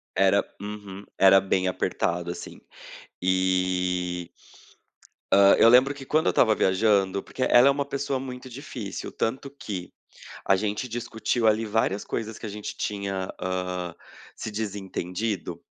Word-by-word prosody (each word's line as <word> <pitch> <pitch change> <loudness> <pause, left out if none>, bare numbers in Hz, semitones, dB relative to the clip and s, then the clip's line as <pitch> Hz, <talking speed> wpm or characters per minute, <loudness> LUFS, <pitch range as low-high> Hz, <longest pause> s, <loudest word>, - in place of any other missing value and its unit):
Era - - +4 0.2
uhum. 100 -1 -8
Era 95 0 +7
bem 95 -1 0
apertado 85 -1 -1
assim. - - -9 0.6
E 90 -1 0 1.0
Hã 100 0 +7
,eu - - +7
lembro 130 +4 +6
que 140 -1 -10
quando 155 +4 +1
eu - - +6
estava 110 -3 +4
viajando, 95 0 +2
porque 130 - -4
ela 125 +1 +6
é - - +6
uma 140 0 -1
pessoa 140 -1 -2
muito 130 0 -7
difícil 120 -5 -7
tanto 130 +4 -2
que, 100 -10 -7 0.5
a 95 - +5
gente 105 +5 -2
discutiu 115 0 -1
ali 110 +1 +3
várias 105 -2 0
coisas 110 -1 -4
que - - -7
a - - -4
gente 105 0 -6
tinha, 100 -2 -3
hã, 90 -1 -3 0.4
se - - -5
desentendido 100 -1 -4
100 Hz, 140 wpm, -26 LUFS, 95-115 Hz, 1.0 s, Era